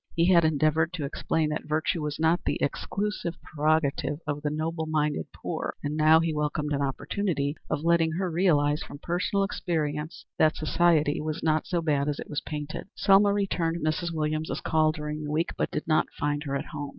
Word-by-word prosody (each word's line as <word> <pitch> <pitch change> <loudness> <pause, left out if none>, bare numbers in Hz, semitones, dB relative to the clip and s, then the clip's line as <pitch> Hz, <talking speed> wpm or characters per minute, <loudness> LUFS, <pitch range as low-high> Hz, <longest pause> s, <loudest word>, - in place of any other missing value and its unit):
He 170 +3 +4
had 170 -1 +6
endeavored 155 +2 +2
to 160 -5 -3
explain 155 +2 -1
that 150 0 -4
virtue 155 +2 0
was 150 0 -3
not 160 +2 +2
the - - 0
exclusive 195 +2 -2
prerogative 150 -2 0
of 145 0 -3
the 150 - -1
noble 160 +1 -2
minded 150 - 0
poor, - - -4
and 145 +1 -2
now 155 +1 +6
he 165 -1 0
welcomed 150 0 -1
an 140 - 0
opportunity 145 +2 -1
of 150 - -1
letting 165 -1 +3
her 180 +1 -1
realize 150 -4 +2
from - - -8
personal 180 +5 0
experience 155 -5 -3
that 155 0 +4
society 155 -2 +2
was 155 0 -4
not 155 -1 +1
so 170 -2 -1
bad 145 -2 +1
as 145 - -2
it - - -8
was 145 - -2
painted. 150 +3 -5
Selma 200 +1 +5
returned 170 -5 0
Mrs. 170 +2 0
Williams's 155 0 -2
call 155 -1 +2
during 150 -1 -5
the 150 - -4
week, 160 +3 0
but - - -1
did - - -4
not 155 -1 +3
find 145 +1 -1
her 140 -1 -2
at 140 +3 -2
home. 145 -3 -6
155 Hz, 195 wpm, -27 LUFS, 150-165 Hz, -, had